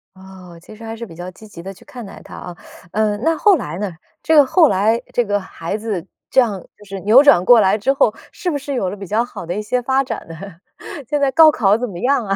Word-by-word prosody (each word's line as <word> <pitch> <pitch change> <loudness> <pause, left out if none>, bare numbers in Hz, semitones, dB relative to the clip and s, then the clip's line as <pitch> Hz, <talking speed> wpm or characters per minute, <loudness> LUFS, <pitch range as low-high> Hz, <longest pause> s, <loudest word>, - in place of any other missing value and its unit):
哦， 190 -2 -14
其 215 - -14
实 225 - -14
还 225 0 -6
是 235 - -7
比 170 -7 -13
较 175 +2 -7
积 215 +4 -15
极 170 -5 -11
地 195 +2 -8
去 190 - -20
看 255 -6 -10
待 195 - -11
它 - - -12
啊， 180 - -9 0.4
呃， 215 -1 0
那 320 +8 0
后 415 -3 +4
来 170 - -6
呢？ 200 -1 -3 0.3
这 320 - +1
个 290 -2 +7
后 325 +4 +4
来 220 +2 +1
这 245 - +2
个 205 -1 -1
孩 185 0 -6
子 210 -6 -4 0.2
这 265 - +4
样 210 -6 -2 0.2
就 210 - -17
是 195 -1 -7
扭 230 +9 +6
转 285 -12 +5
过 240 -3 +7
来 190 +2 +2
之 245 +6 0
后， 230 -5 +2 0.2
是 360 - -4
不 290 - -2
是 280 0 -6
有 195 -8 -1
了 200 - -7
比 195 - -8
较 220 +5 +1
好 245 - -9
的 175 - -4
一 210 - -3
些 245 +4 -2
发 265 +2 +1
展 230 -5 -6
呢？ 165 - -9 0.7
现 295 - 0
在 275 - +2
高 315 +2 +7
考 210 -7 +2
怎 245 +1 -3
么 175 -3 -8
样 260 0 +1
啊？ 195 -1 -1
215 Hz, 290 characters per minute, -18 LUFS, 195-260 Hz, 0.7 s, 个